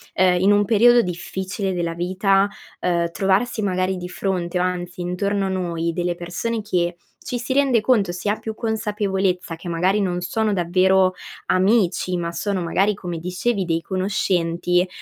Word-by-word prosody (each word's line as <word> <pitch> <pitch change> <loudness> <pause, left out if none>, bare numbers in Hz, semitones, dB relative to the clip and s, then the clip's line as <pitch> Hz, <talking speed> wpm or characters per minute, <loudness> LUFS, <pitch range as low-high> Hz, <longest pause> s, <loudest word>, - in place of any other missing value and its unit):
uhm, 180 -1 +4
in 195 +3 +4
un 205 0 +4
periodo 235 +3 +5
difficile 190 +1 -3
della 170 -1 -2
vita, 195 +3 +2 0.3
uhm, 170 -1 0
trovarsi 195 +5 +1
magari 185 -1 0
di 180 0 -6
fronte 180 -1 -2
o 180 - +1
anzi 180 -1 -3
intorno 195 +3 -1
a - - -2
noi 170 -3 -1
delle 175 +1 -1
persone 180 +7 -3
che, 175 -4 -1 0.3
ci 245 - -2
si 250 +3 -5
rende 265 -4 +3
conto, 210 -7 +2
si 180 +3 -3
ha 210 - 0
più 220 -1 -5
consapevolezza 200 -6 -1
che 170 - -10
magari 180 +4 +1
non 180 -2 -1
sono 215 +4 0
davvero 185 +1 +3 0.3
amici, 185 -2 +2
ma 170 -1 -2
sono 195 +1 -2
magari 195 +5 +2
come 180 -4 -5
dicevi, 185 +4 -1
dei 165 -1 0
conoscenti, 180 -2 0
185 Hz, 165 wpm, -22 LUFS, 175-205 Hz, 0.3 s, periodo